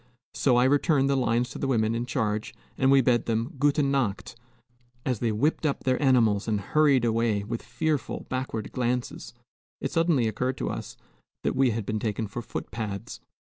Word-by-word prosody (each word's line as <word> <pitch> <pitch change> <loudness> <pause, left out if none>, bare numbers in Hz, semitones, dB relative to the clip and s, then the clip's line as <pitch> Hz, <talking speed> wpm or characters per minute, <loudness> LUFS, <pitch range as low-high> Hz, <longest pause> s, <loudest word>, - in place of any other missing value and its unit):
So 130 -3 +2
I 125 - +5
returned 140 0 +3
the - - +2
lines 125 -1 +1
to - - -7
the 135 - -1
woman 110 -4 +1
in 120 +1 -2
charge, 110 -4 -2 0.2
and 130 - +2
we 135 0 +6
bade 120 -1 +2
them 115 +1 -1
"Guten 145 0 +2
Nacht." 120 -6 -1 0.7
As 125 -5 -1
they 115 -2 0
whipped 145 +12 0
up 150 -3 -1
their 130 +1 +1
animals 115 -7 +3
and 105 -2 +1
hurried 140 +3 +3
away, 115 -3 +1
with 115 +3 -4
fearful 140 +5 -2
backward 130 -4 -4
glances, 120 - -3 0.4
it - - -3
suddenly 165 -8 +2
occurred 125 +4 -2
to - - -2
us - - -7 0.5
that - - 0
we 130 -1 +4
had 115 -2 -2
been 110 +1 -2
taken 110 0 -2
for 105 +4 -6
footpads. 105 -4 -6
120 Hz, 180 wpm, -26 LUFS, 110-135 Hz, 0.7 s, we